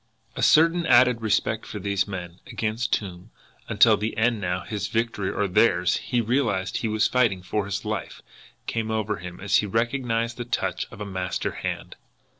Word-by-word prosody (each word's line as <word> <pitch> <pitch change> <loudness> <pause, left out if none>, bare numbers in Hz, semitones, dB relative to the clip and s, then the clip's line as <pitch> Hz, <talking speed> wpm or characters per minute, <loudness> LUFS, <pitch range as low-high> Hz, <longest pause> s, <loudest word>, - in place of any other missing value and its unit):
A - - -4
certain 165 +2 +5
added 125 -1 +5
respect 110 0 0
for - - -6
these 100 0 -1
men, 90 -3 -7
against 115 0 -1
whom, 90 -4 -7 0.4
until - - +6
the 110 +2 -3
end 110 -1 +2
now, 90 0 -1
his 100 -1 -4
victory 110 -3 -1
or 105 - -1
theirs, 90 -2 +3
he 120 -2 -1
realised 115 -5 0
he 115 - -2
was 110 0 +2
fighting 115 -8 +1
for 105 +2 -2
his 100 - -4
life, - - -4 0.4
came 115 -1 -2
over 110 -1 -1
him 90 0 -9
as 100 +1 +2
he 105 - 0
recognised 115 +1 -1
the 120 - -3
touch 120 - -2
of - - -11
a - - -3
master 95 -2 -3
hand. - - -5
110 Hz, 180 wpm, -25 LUFS, 95-115 Hz, 0.4 s, until